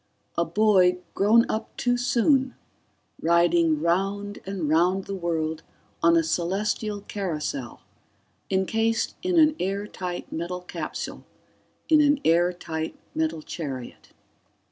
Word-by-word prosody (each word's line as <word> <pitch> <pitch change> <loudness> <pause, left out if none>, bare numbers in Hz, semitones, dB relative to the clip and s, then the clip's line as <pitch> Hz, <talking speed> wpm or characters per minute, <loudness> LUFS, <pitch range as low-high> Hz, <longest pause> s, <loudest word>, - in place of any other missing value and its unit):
A 170 - +1
boy 185 -1 +4 0.2
grown 225 +4 +4
up 220 - -4
too 245 0 +1
soon, 255 +2 +2 0.7
riding 170 -2 +3
round 195 +4 -1
and 190 -5 -3
round 175 +5 +2
the 200 - -5
world 160 -3 -2 0.4
on 170 0 +5
a 165 - +3
celestial 200 +5 -1
carousel, 150 - -4 0.7
encased 225 +4 +1
in 365 -1 0
an 310 -1 +5
airtight 190 -2 -4
metal 175 +2 -4
capsule 180 - -6 0.6
in 310 -1 +6
an 290 -1 +3
airtight 165 -1 0 0.2
metal 160 0 -1
chariot 135 -8 -7
180 Hz, 110 wpm, -25 LUFS, 165-210 Hz, 0.7 s, in